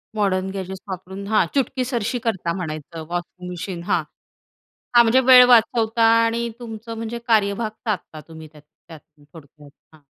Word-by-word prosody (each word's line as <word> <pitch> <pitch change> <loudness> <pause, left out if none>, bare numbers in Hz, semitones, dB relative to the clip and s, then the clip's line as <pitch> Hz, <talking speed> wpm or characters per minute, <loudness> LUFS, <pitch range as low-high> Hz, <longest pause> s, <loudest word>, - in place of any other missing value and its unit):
Modern 190 -2 0
gadgets 190 -1 -6
वापरून 190 +2 -7
हां, 215 -4 +3
चुटकीसरशी 255 -3 -1
करता 180 -6 -1
म्हणायचं 160 -1 -6
वॉशिंग 175 +1 -6
मशीन 175 0 -6
हां. - - 0 0.9
हां 240 - +8
म्हणजे 235 +3 +4
वेळ 250 -1 +8
वाचवता 230 -1 +3 0.2
आणि 235 +1 -1
तुमचं 225 -1 -8
म्हणजे 230 +1 -5
कार्यभाग 215 0 +1 0.2
साधता 175 -7 -4
तुम्ही 160 -1 -11
त्यात 150 - -16 0.3
त्यातून 155 -2 -16
थोडक्यात 150 -2 -16 0.2
हां. 155 - -22
200 Hz, 140 wpm, -21 LUFS, 170-230 Hz, 0.9 s, हां